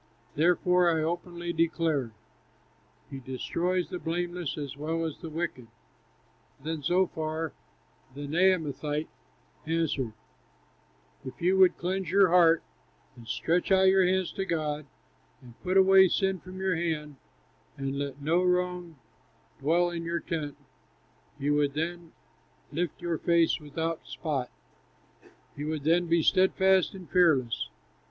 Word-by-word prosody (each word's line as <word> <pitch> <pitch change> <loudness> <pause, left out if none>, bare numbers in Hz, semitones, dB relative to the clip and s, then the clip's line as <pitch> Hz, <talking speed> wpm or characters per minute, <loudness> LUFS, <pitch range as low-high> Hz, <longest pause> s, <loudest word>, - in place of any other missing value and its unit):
Therefore, 180 +2 +3
I 160 -2 +1
openly 175 +1 -3
declare: 160 -6 0 1.0
He 135 - -6
destroys 170 +8 -2
the 180 - -5
blameless 175 -1 -3
as 140 -2 -5
well 160 +3 -2
as 155 -3 -5
the 165 - -7
wicked." 155 -7 -4 0.9
Then 155 +2 -4
Zophar, 160 -1 -1 0.6
the 145 +1 -6
Naamathite, 155 -3 +1 0.6
answered: 155 -8 -1 1.1
"If 130 - -9
you 180 +3 +2
would 185 -1 +6
cleanse 185 0 -2
your 195 0 +5
heart, 165 -2 +5 0.5
And 120 -2 -14
stretch 175 - 0
out 190 0 +6
your 190 0 +5
hands 185 0 +1
to 195 - -3
God, 155 -4 -2 0.5
And 120 -2 -16
put 185 +1 +1
away 190 0 +7
sin 190 0 0
from 185 +2 -10
your 190 -2 0
hand, 155 -4 -3 0.6
And 135 0 -3
let 140 0 -4
no 165 +4 +2
wrong 180 -2 -1 0.6
dwell 170 +5 +2
in 170 -1 -4
your 170 0 -2
tent, 150 -4 -4 0.8
You 145 0 0
would 145 -1 +1
then 170 +1 -4 0.6
lift 165 +1 -3
your 170 -2 -1
face 170 -1 +2
without 160 +2 -4
spot, 140 -6 -3 1.1
You 145 +1 -5
would 155 -2 -3
then 170 +3 +2
be 165 -1 +2
steadfast 190 +1 +3
and 185 -3 -10
fearless." 135 - +2
165 Hz, 130 wpm, -28 LUFS, 150-180 Hz, 1.1 s, away